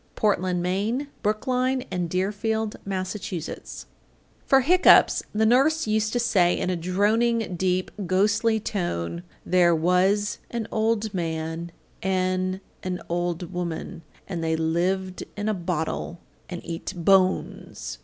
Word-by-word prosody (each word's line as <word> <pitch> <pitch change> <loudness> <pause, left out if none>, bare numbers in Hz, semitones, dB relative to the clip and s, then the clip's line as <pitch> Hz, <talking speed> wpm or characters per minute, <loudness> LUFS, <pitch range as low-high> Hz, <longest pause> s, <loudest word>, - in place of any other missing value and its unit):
Portland, 185 -4 +1
Me., 205 +9 0 0.2
Brookline 255 +4 0
and 175 -2 -2
Deerfield, 210 +4 -1
Mass. 185 0 -3
847. 180 -5 -6 0.6
For 270 0 +6
hiccoughs 360 +8 +6
the 220 +1 +1
nurse 275 +8 +3
used 215 0 +1
to 245 - +1
say 195 -7 +3
in 185 - -1
a - - 0
droning, 205 +4 +1
deep, 185 +1 0 0.2
ghostly 210 +4 +2
tone, 175 - -3 0.2
There 175 -2 +4
was 185 +5 +2
an 235 -2 -3
old 220 -1 0
man 165 -1 -3 0.3
an' 185 0 0 0.2
an 180 -1 -3
old 175 +1 -2
woman, 170 -2 -4 0.3
And 175 -4 -4
they 160 0 +1
lived 180 +4 -1
in 205 +1 -2
a 215 - +2
bottle 175 -2 -3 0.3
and 175 -2 -7
eat 170 +3 -5
BONES. 185 - +1
185 Hz, 125 wpm, -25 LUFS, 175-215 Hz, 0.6 s, For